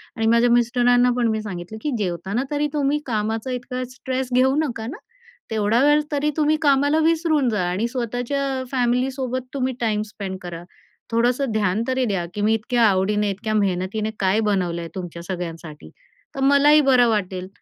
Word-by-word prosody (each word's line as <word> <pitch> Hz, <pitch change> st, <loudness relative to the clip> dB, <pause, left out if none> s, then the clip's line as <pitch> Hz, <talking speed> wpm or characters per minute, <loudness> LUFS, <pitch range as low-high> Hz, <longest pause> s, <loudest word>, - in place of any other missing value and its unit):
आणि 225 Hz, -, -1 dB
माझ्या 235 Hz, +1 st, +4 dB
मिस्टरांना 245 Hz, +1 st, +3 dB
पण 240 Hz, -1 st, +2 dB
मी 220 Hz, -, -2 dB
सांगितलं 195 Hz, 0 st, -7 dB
की 300 Hz, -, -2 dB
जेवताना 195 Hz, +4 st, -2 dB
तरी 295 Hz, 0 st, 0 dB
तुम्ही 290 Hz, 0 st, +1 dB
कामाचा 220 Hz, +1 st, -2 dB
इतका 250 Hz, +1 st, -4 dB
स्ट्रेस 260 Hz, 0 st, -3 dB
घेऊ 260 Hz, +2 st, +4 dB
नका 230 Hz, -5 st, -5 dB
ना. 300 Hz, -, -6 dB, 0.5 s
तेवढा 220 Hz, +3 st, +2 dB
वेळ 295 Hz, +1 st, +5 dB
तरी 295 Hz, +1 st, 0 dB
तुम्ही 310 Hz, 0 st, +2 dB
कामाला 285 Hz, +1 st, +3 dB
विसरून 315 Hz, -4 st, +2 dB
जा, 210 Hz, -4 st, 0 dB
आणि 200 Hz, +6 st, -1 dB
स्वतःच्या 260 Hz, +2 st, -2 dB
फॅमिलीसोबत 255 Hz, 0 st, -1 dB
तुम्ही 260 Hz, -1 st, -1 dB
टाईम 215 Hz, -3 st, 0 dB
स्पेंड 190 Hz, -3 st, -6 dB
करा. 175 Hz, -1 st, -7 dB, 0.5 s
थोडंसं 240 Hz, +3 st, +1 dB
ध्यान 210 Hz, -1 st, 0 dB
तरी 260 Hz, 0 st, 0 dB
द्या 195 Hz, -6 st, -1 dB
की 210 Hz, -, -4 dB
मी 215 Hz, +2 st, +3 dB
इतक्या 235 Hz, +2 st, +1 dB
आवडीने, 205 Hz, 0 st, +2 dB
इतक्या 215 Hz, +3 st, -4 dB
मेहनतीने 200 Hz, +2 st, 0 dB
काय 195 Hz, +2 st, +2 dB
बनवलं 180 Hz, -4 st, 0 dB
आहे 165 Hz, -, -7 dB
तुमच्या 175 Hz, -2 st, -6 dB
सगळ्यांसाठी, 170 Hz, -4 st, -7 dB, 0.5 s
तर -, -, -5 dB
मलाही 285 Hz, +2 st, +6 dB
बरं 250 Hz, -2 st, +5 dB
वाटेल. 185 Hz, -4 st, -2 dB
235 Hz, 165 wpm, -22 LUFS, 205-265 Hz, 0.5 s, मलाही